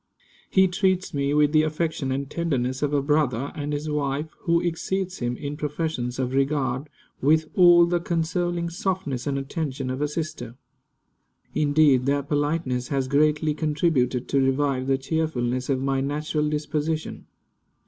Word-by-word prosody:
He 190 0 +5
treats 185 0 0
me 140 -1 0
with 150 -1 +4
the 155 0 +5
affection 155 -3 -1
and 135 +1 -2
tenderness 130 -5 -1
of 145 -1 0
a 145 -2 +1
brother, 140 -3 +1
and 145 0 -4
his 145 +1 -3
wife, 150 +1 -2
who 170 0 +3
exceeds 185 +2 -2
him 120 0 -2
in 145 0 -5
professions 150 -4 -3
of 130 -1 -2
regard, 135 0 0 0.3
with 155 +3 +3
all 175 -2 +7
the 175 0 0
consoling 170 0 -1
softness 170 -8 -2
and 140 -1 0
attention 135 -2 -3
of 130 +2 -4
a 150 - +2
sister. 150 -6 -5 1.0
Indeed, 145 -3 +3
their 140 0 +1
politeness 145 -3 -1
has 135 -2 -1
greatly 150 +2 +2
contributed 150 -5 0
to 140 - +2
revive 135 -1 +1
the 135 -1 +2
cheerfulness 130 -4 -1
of 135 -2 +1
my 135 -1 0
natural 150 +2 -1
disposition. 155 +1 -3
150 Hz, 150 wpm, -24 LUFS, 135-160 Hz, 1.0 s, all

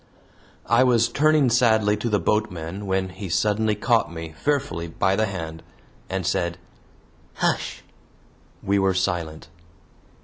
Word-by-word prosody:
I - - +4
was 120 -2 +4
turning 150 -3 +3
sadly 110 -4 +3
to 115 +3 -2
the 105 - +2
boatmen 100 -2 -2
when 95 0 0
he 95 +1 -7
suddenly 105 +4 +1
caught 115 -2 +1
me 80 -1 -7
fearfully 140 - -1
by 95 +4 0
the 110 +2 +1
hand 80 -4 -6 0.5
and 95 -2 -2
said: 85 0 -1 0.8
"Hush!" - - -1 0.8
We 100 +1 +2
were 95 -1 +2
silent. 85 -4 -2
100 Hz, 130 wpm, -23 LUFS, 85-110 Hz, 0.8 s, I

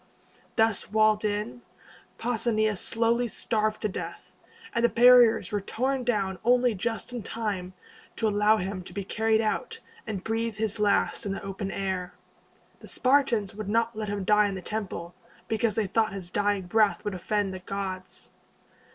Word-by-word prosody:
Thus 225 -3 +1
walled 215 0 +3
in, 210 +3 -2 0.6
Pausanias 220 -3 0
slowly 235 +1 +1
starved 215 -1 -1
to - - +2
death, 195 - -7 0.4
and 235 - 0
the 235 - +5
barriers 245 -1 +6
were 205 -1 -1
torn 260 +6 -1
down 200 -6 -1
only 245 0 +4
just 225 +4 -3
in 240 - -4
time 200 -5 -4 0.4
to 220 - 0
allow 210 +1 +3
him 190 -1 -3
to 175 - -10
be 200 +1 -3
carried 220 +3 +1
out, 220 - -2 0.3
and 200 -4 -4
breathe 225 0 -2
his 215 0 -2
last 205 0 +1
in 195 - -1
the - - -6
open 195 0 -4
air. 185 -2 -3 0.6
The - - -12
Spartans 255 -6 +2
would 210 -1 -6
not 230 +1 +1
let 215 -1 -4
him 200 -1 -2
die 210 +1 +4
in 200 - -3
the 190 - -6
temple, 190 -5 -5 0.3
because 220 0 0
they 220 - +1
thought 220 +2 +1
his 185 -3 -6
dying 205 -1 +1
breath 210 +2 +2
would 205 - -2
offend 195 +1 -1
the 185 - -6
gods. 190 0 -6
215 Hz, 170 wpm, -27 LUFS, 195-225 Hz, 0.6 s, barriers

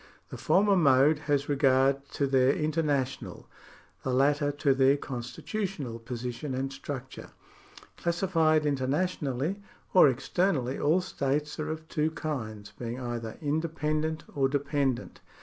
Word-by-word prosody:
The - - -7
former 200 +1 +3
mode 145 -2 +5
has 145 0 +2
regard 135 -1 +2
to 140 - +1
their 135 0 +3
international, 150 -4 -1 0.5
the 130 - -2
latter 145 +3 +2
to 145 -1 +2
their 135 +1 +4
constitu 130 - -5
tional 140 - -4
position 125 +3 -4
and 135 +1 -3
structure. 135 -1 -7 0.7
Classified 165 -3 +2
internationally 145 +3 -1 0.3
or 180 -6 +8
externally, 135 0 0
all 160 +5 +3
states 150 -4 -2
are 155 0 -2
of 160 0 -5
two 155 -1 0
kinds, 110 -10 -5
being 120 +1 -4
either 120 -3 -5
indepen 155 0 -1
dent 160 0 -3
or 135 -2 +2
dependent. 140 -2 -1
140 Hz, 130 wpm, -28 LUFS, 130-155 Hz, 0.7 s, or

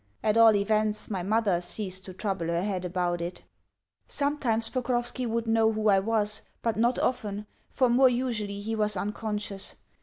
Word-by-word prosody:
At 215 0 +2
all 225 -1 +7
events 215 +1 0
my 190 -3 -1
mother 200 -2 +1
ceased 185 +1 -5
to 185 - -8
trouble 190 -5 -2
her 170 +1 0
head 190 -3 -2
about 175 -1 -1
it. 175 +1 -5 0.6
Sometimes 270 -6 0
Pokrovski 245 0 -1
would 230 0 -1
know 225 0 +3
who 215 -1 +1
I 195 -1 +5
was, 210 0 0 0.2
but 230 -2 +1
not 235 +3 +2
often, 210 -5 -1 0.2
for 255 - +2
more 255 +2 +5
usually 225 -5 -2
he 225 +2 -2
was 210 -2 0
unconscious. 210 0 -4
215 Hz, 170 wpm, -28 LUFS, 195-230 Hz, 0.6 s, all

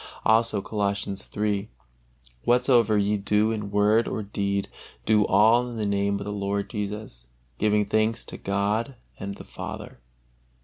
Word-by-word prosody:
Also 110 -2 +3
Colossians 100 -2 -2
iii: 105 0 0 0.7
"Whatsoever 120 -3 +4
ye 105 +1 +2
do 105 +2 +2
in 105 -2 -3
word 105 +3 +3
or 110 - -3
deed, 100 -1 -2 0.4
do 105 -2 +4
all 120 +3 +4
in 120 - -7
the 110 - -1
Name 100 0 +1
of 100 - -6
the 105 - -4
Lord 100 0 -2
Jesus, 105 - -5 0.3
giving 105 -1 +2
thanks 110 +2 0
to - - -8
God 105 +6 -1 0.2
and 100 0 -5
the - - -10
Father." - - -8
105 Hz, 145 wpm, -26 LUFS, 100-110 Hz, 0.7 s, Whatsoever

